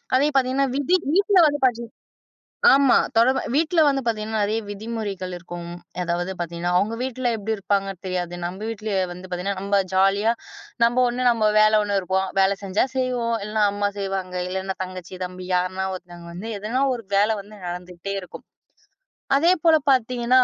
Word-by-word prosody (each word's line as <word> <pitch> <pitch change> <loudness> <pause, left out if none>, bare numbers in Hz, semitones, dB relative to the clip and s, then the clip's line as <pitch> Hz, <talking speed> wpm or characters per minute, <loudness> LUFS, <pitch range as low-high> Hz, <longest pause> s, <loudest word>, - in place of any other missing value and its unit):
அதே 265 +3 +4
பாத்தீங்கன்னா 265 +1 +2
விதி 285 +6 +2 0.2
வீட்ல 400 +2 +3
வந்து 290 -1 +1
பாத்தீங் 235 -2 0 0.8
ஆமா. 275 -2 +5 0.2
தொட 230 +2 +5 0.3
வீட்ல 325 +3 +2
வந்து 275 -1 +2
பாத்தீங்கன்னா 220 -1 -1
நிறைய 215 +2 0
விதிமுறைகள் 205 -3 -5
இருக்கும். 175 0 -8 0.3
அதாவது 175 +2 -2
பாத்தீங்கன்னா, 170 +1 -2
அவங்க 210 +5 0
வீட்ல 255 -1 -2
எப்படி 220 +1 -2
இருப்பாங்க 195 0 0
தெரியாது. 180 -2 -3
நம்ம 180 +2 -5
வீட்ல 220 -1 -5 0.2
வந்து 180 +1 -9
பாத்தீங்கன்னா 185 +2 -3
நம்ம 200 0 +2
ஜாலியா, 195 +4 +3 0.5
நம்ம 240 +2 +4
ஒண்ணு 245 +1 -2
நம்ம 220 -2 +2
வேலை 215 0 +5
ஒண்ணு 205 -1 0
இருப்போம். 190 +1 0
வேலை 195 +1 +4
செஞ்சா 195 +5 +1
செய்வோம். 245 -3 0
இல்லன்னா, 210 +1 0
அம்மா 205 0 0
செய்வாங்க. 190 -2 -3
இல்லன்னா, 190 +1 -3
தங்கச்சி, 185 -1 -8
தம்பி 180 0 -8
யாருன்னா 185 +1 -1
ஒருத்தவங்க 175 -2 -11
வந்து 195 +6 -6
எதுனா 230 +6 -1
ஒரு 230 -3 -9
வேலை 210 +2 +3
வந்து 210 +2 -14
நடந்துகிட்டே 180 +2 -6
இருக்கும். 180 - -11 0.9
அதேபோல 330 0 +4 0.2
பாத்தீங்கன்னா, 250 0 +3
205 Hz, 155 wpm, -23 LUFS, 185-240 Hz, 0.9 s, ஆமா